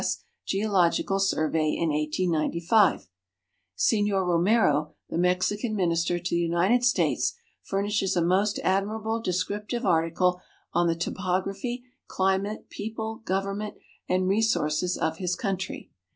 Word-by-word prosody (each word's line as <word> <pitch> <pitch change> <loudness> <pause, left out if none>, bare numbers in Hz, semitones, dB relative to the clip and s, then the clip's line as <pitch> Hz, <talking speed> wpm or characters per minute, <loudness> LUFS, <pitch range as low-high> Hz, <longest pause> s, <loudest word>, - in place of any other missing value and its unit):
S. - - 0 0.3
Geological 195 -1 +1
Survey 155 -5 +1
in 165 - 0
1895." 170 - +1 0.7
Signor 205 - +2
Romero, 170 -4 +2 0.2
the - - -1
Mexican 185 +5 +1
Minister 170 -2 +1
to 175 0 -4
the 170 - +2
United 175 +8 +2
States, 245 0 +2 0.3
furnishes 200 0 -1
a 175 - +2
most 195 +4 +2
admirable 215 +4 0
descriptive 210 +5 -2
article 175 +2 +2 0.3
on 175 0 +3
the 165 - +1
topography, 195 +7 -2 0.2
climate, 195 +2 -1
people, 220 +1 -5
government, 195 +2 -2 0.3
and 185 0 +1
resources 185 -5 +1
of 160 0 -1
his 180 0 -1
country. 195 -5 -4
190 Hz, 115 wpm, -26 LUFS, 170-210 Hz, 0.7 s, on